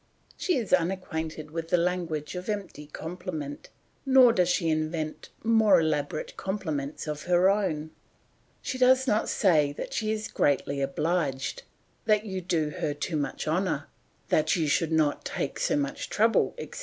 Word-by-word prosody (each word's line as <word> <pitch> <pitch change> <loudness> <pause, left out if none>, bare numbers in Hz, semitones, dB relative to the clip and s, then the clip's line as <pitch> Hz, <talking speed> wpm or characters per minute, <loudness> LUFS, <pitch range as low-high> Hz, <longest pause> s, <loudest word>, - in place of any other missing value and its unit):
She 360 -6 0
is 225 -7 -2
unacquainted 160 -4 -1
with 165 0 -4
the 180 - +4
language 170 -3 -1
of 180 +2 -6
empty 200 -8 -4
compliment, 160 -2 -6 0.3
nor 260 -3 +6
does 180 -3 +2
she 180 -2 +1
invent 155 0 -2
more 220 -4 +5
elaborate 155 -2 -1
compliments 160 -8 -3
of 150 -1 -4
her 180 +2 +4
own; 160 -7 -1 0.7
she 255 - -3
does 260 +1 +5
not 220 -4 +1
say 155 -8 +3
that - - -6
she 215 -1 -1
is 215 0 -2
greatly 140 0 0
obliged, 145 - -1 0.4
that 215 -1 +3
you 190 -3 -4
do 160 -4 0
her 145 - -1
too 155 +3 -3
much 150 +1 -3
honour, 160 -2 -1 0.4
that 155 - +3
you 160 -3 0
should 160 +2 +1
not 155 -2 +2
take 140 - -3
so - - +1
much 140 -1 -3
trouble, 225 +2 +2
etc. 475 - -7
170 Hz, 155 wpm, -27 LUFS, 150-195 Hz, 0.7 s, nor